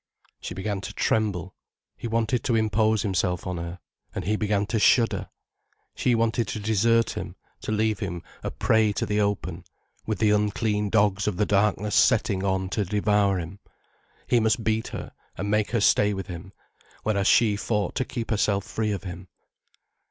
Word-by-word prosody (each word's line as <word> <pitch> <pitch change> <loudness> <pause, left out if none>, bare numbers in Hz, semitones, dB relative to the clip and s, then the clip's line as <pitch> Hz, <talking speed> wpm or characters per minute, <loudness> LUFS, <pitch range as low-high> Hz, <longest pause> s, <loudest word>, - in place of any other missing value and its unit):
She - - -6
began 95 0 -3
to - - -7
tremble. 100 -4 0 0.4
He - - -6
wanted 115 +1 0
to 120 - +2
impose 110 0 +2
himself 90 -3 -1
on 90 -1 -3
her. 85 +1 -5 0.4
And - - -3
he 105 +4 +1
began 105 -1 0
to 110 +2 -1
shudder. 115 +2 +3 0.6
She 125 - +1
wanted 115 -1 +1
to 110 - -4
desert 115 +2 +2
him, - - -6 0.3
to - - -4
leave 110 -1 +1
him 90 -3 -4 0.2
a - - -3
prey 110 -2 +2
to - - -1
the 105 0 0
open, 95 -4 -2 0.4
with 110 -2 -1
the 105 0 +3
unclean 105 0 +1
dogs 100 -2 +2
of 100 -4 -1
the 105 - +2
darkness 105 +1 +1
setting 100 -1 +3
on 95 -1 0
to 105 +2 0
devour 105 0 +2
him. 85 +4 -7 0.7
He 120 - +3
must 110 +1 +1
beat 110 +1 0
her, - - -7 0.3
and 100 +1 -2
make 105 0 +2
her 115 -2 0
stay 105 0 +4
with 95 - -4
him. 90 +1 -8 0.5
Whereas 100 -2 +1
she 110 -3 +4
fought 105 0 -1
to - - 0
keep 120 -3 -5
herself 100 -2 +1
free 110 -1 -2
of 100 - -5
him. 90 0 -8
105 Hz, 180 wpm, -25 LUFS, 100-110 Hz, 0.7 s, stay